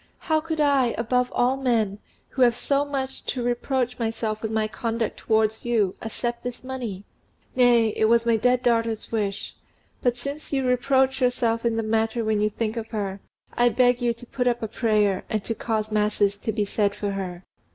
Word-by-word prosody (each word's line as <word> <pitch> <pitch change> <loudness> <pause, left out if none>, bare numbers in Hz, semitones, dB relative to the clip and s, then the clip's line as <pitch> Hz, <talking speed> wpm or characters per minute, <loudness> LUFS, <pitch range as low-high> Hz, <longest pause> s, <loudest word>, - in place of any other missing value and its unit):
"How 315 -1 0
could 320 0 -4
I, 275 -5 +3
above 250 +2 +1
all 250 +2 +2
men, 225 -6 0 0.3
who 260 - -4
have 240 -2 +5
so 280 +3 +1
much 270 -2 -4
to 250 - -2
reproach 245 +1 -1
myself 225 -1 -2
with 220 - -2
in 220 - -3
my 215 -1 +1
conduct 225 +2 -3
towards 220 -1 +1
you, 220 -6 +1
accept 235 +1 -3
this 245 0 -6
money?" 245 -7 -5 0.5
"Nay; 240 -3 +5
it 220 - +1
was 230 +1 +4
my 230 -1 +4
dead 250 +3 +2
daughter's 230 -2 0
wish. 205 -3 -2 0.5
But 245 -1 +1
since 280 +5 -6
you 270 -2 0
reproach 265 +1 +2
yourself 240 -2 +1
in 230 -1 +2
the 225 - 0
matter 225 +1 0
when 215 -1 +1
you 210 - +2
think 220 +1 -3
of 225 -1 -4
her, 200 -4 -3 0.3
I 240 - +3
will 240 - 0
beg 245 -1 +4
you 240 -1 +2
to 240 - -13
put 250 +1 -2
up 240 -1 +1
a - - -1
prayer 210 -4 +1
and 215 -2 -1
to 230 - -1
cause 220 -1 -2
masses 210 -1 +2
to 205 +2 -3
be 210 -1 0
said 200 0 0
for 205 -1 -2
her." 185 -2 -5
230 Hz, 205 wpm, -24 LUFS, 215-250 Hz, 0.5 s, have